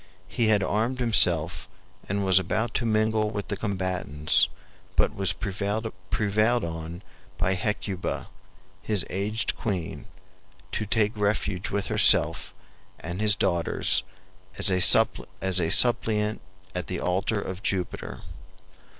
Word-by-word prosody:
He 115 - 0
had 105 -3 +3
armed 115 +7 -1
himself 90 -10 +2 0.4
and 100 +1 -1
was 95 -1 +5
about 110 +5 -2
to 120 - -1
mingle 110 0 +1
with 105 -1 -6
the 100 - -1
combatants, 95 -7 0 0.5
but - - +2
was 95 -3 0
prevailed 100 +3 -3 0.8
on 80 +2 -7 0.3
by 90 +2 +1
Hecuba, 95 -1 -3 0.5
his 105 -4 +4
aged 105 +3 -2
queen, 100 +1 -4 0.6
to 110 - -3
take 105 +1 +1
refuge 100 -2 -1
with 100 0 -2
herself - - +3 0.5
and 85 +4 -6
his 105 -1 +4
daughters 85 -4 +1 0.6
as - - +5
a 90 0 +2
suppliant 105 +6 +3 0.3
at - - -4
the - - -4
altar 95 +4 -1
of 95 -1 -6
Jupiter. 95 -3 -4
100 Hz, 115 wpm, -25 LUFS, 90-110 Hz, 0.8 s, was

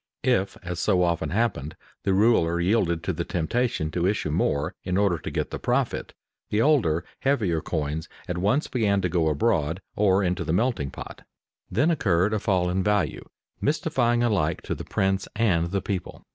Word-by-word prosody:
If, 100 -6 +1
as 85 -1 -4
so 90 -2 +2
often 85 -3 0
happened, 85 - -1 0.3
the 95 - +2
ruler 95 -6 +3
yielded 85 -3 +1
to - - -1
the - - -2
temptation 90 -1 -1
to 90 +1 0
issue 100 -6 -1
more 75 0 0
in 90 0 -1
order 100 -5 +2
to - - -5
get - - -3
the - - -4
profit, - - -1 0.3
the 105 - +1
older, 110 - +3
heavier 105 - +1
coins 80 0 -3 0.2
at 90 -1 -2
once 105 - +2
began 100 -5 +1
to 90 - 0
go 85 -2 +1
abroad 80 0 +1 0.2
or 100 -1 +3
into 90 -1 0
the 80 - -1
melting 110 - 0
pot. - - -9 0.5
Then 140 - +2
occurred 95 - +2
a 110 - +1
fall 95 -3 +1
in 90 +1 0
value, 105 -1 0 0.4
mystifying 130 -6 +1
alike 90 -9 +1
to - - -2
the - - -7
prince 95 0 0
and 95 -7 +2
the 100 +1 -2
people. 95 -4 -4
95 Hz, 180 wpm, -25 LUFS, 85-110 Hz, 0.5 s, ruler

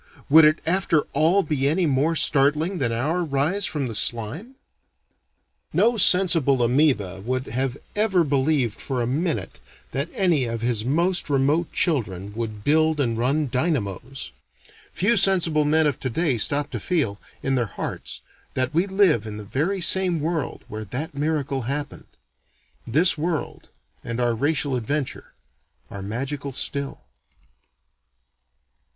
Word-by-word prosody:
Would 160 +1 +8
it 155 +1 +3
after 170 -2 +2
all 165 +7 +3
be 140 -5 0
any 170 +5 +1
more 150 +3 +1
startling 150 +5 +2
than 120 -3 0
our 150 +10 -1
rise 160 +7 0
from 145 -4 -3
the 120 - -5
slime? 120 - 0 1.2
No 235 +1 +3
sensible 170 - +4
amoeba 120 -7 +1
would 130 +3 -2
have 130 +3 -2 0.2
ever 200 -4 +2
believed 135 -5 0
for 130 -3 -3
a 120 - 0
minute 155 +7 -2 0.3
that 140 +5 -2
any 170 -9 +2
of 115 -1 -4
his 115 -3 0
most 170 +7 +1
remote 145 +4 +1
children 100 - -1
would 110 -2 -5
build 155 +2 +2
and 120 -5 0
run 140 +6 0
dynamos. 130 - -2 0.6
Few 210 +6 +2
sensible 170 -7 +3
men 155 +2 +3
of 145 -4 0
today 130 0 -1
stop 145 +6 0
to - - -4
feel, 125 - -1 0.2
in 135 - 0
their 120 -3 0
hearts, - - -6 0.3
that 130 +2 0
we 170 +5 +1
live 190 - +2
in 105 -1 -6
the 105 - -8
very 170 - -1
same 180 -1 +3
world 160 0 -3
where 110 +1 -6
that 145 - -5
miracle 145 -2 -2
happened. 145 +1 -5 0.8
This 160 +6 +3
world, 165 0 -3 0.3
and 115 +1 -4
our 120 -1 +1
racial 140 +2 0
adventure, 135 +4 -4 0.6
are 100 - -7
magical 135 +7 -4
still. 140 +2 -4
145 Hz, 140 wpm, -23 LUFS, 125-165 Hz, 1.2 s, Would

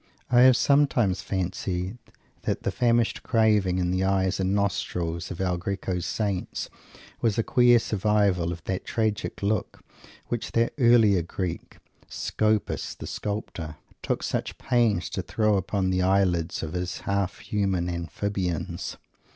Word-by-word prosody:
I 120 - +6
have 130 -1 +7
sometimes 125 -10 +3
fancied 95 +2 -3 0.4
that - - -2
the - - 0
famished 120 -2 +1
craving 105 -6 +2
in 90 -1 0
the 95 +1 0
eyes 95 0 +1
and 95 0 +1
nostrils 90 -4 -1
of 90 - -7
El 90 -2 0
Greco's 90 -1 -3
saints 100 -4 -2 0.5
was 110 -3 +1
a 115 - +2
queer 120 0 +5
survival 100 -5 +1
of 85 -1 -7
that 95 -1 -3
tragic 110 -3 -2
look 100 0 -1 0.4
which 120 -2 -4
that 115 0 +2
earlier 115 -6 +5
Greek, 85 +1 -5 0.3
Scopas 110 -1 -1
the - - -8
Sculptor, 95 -6 -4 0.3
took - - -2
such - - -2
pains 115 -8 +1
to 95 - -2
throw 105 +4 +1
upon 95 0 0
the 95 0 +1
eyelids 90 -4 +1
of 80 - -5
his 90 0 -3
half 100 -1 -1
human 95 -4 -1
amphibiums. 90 +1 -3
95 Hz, 140 wpm, -26 LUFS, 90-110 Hz, 0.5 s, have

